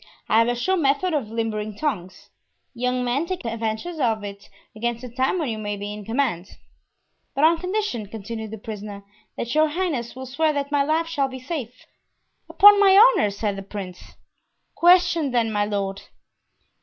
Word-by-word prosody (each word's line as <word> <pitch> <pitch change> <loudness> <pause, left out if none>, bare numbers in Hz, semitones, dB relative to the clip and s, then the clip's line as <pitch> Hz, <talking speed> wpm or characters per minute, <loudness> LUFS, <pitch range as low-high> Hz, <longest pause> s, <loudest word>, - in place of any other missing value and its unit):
I 220 - +4
have 230 - +4
a 245 - 0
sure 375 +11 0
method 305 +3 +1
of 275 -8 -1
limbering 215 -2 -3
tongues. 190 - -4 0.4
Young 250 +1 -1
men, 260 +7 -1
take 370 -7 -4
advantage 230 +9 -3
of 225 -5 0
it 200 0 -9 0.3
against 235 +1 -2
the 250 - -6
time 260 +7 +1
when 320 -5 -1
you 220 -1 -3
may 205 -1 -3
be 205 +1 -5
in 210 -1 -9
command." 225 -7 -2 0.8
"But 275 - 0
on 325 +1 +5
condition," 365 - -2
continued 220 +1 -6
the 220 - -7
prisoner, 205 -1 -8 0.3
"that 235 - -3
your 310 +1 +4
highness 300 -8 -2
will 260 0 -7
swear 305 +4 0
that 285 0 -3
my 290 -1 +3
life 310 +4 +1
shall 310 -5 -1
be 260 0 -8
safe." 255 -3 -6 0.6
"Upon 410 0 +8
my 390 -1 +6
honor," 450 - +6
said 200 0 -3
the - - -5
prince. 195 -2 -9 0.6
"Question, 350 -3 +4
then, 235 -3 +1
my 205 -1 +1
lord." 200 -1 -3
245 Hz, 180 wpm, -23 LUFS, 215-310 Hz, 0.8 s, Upon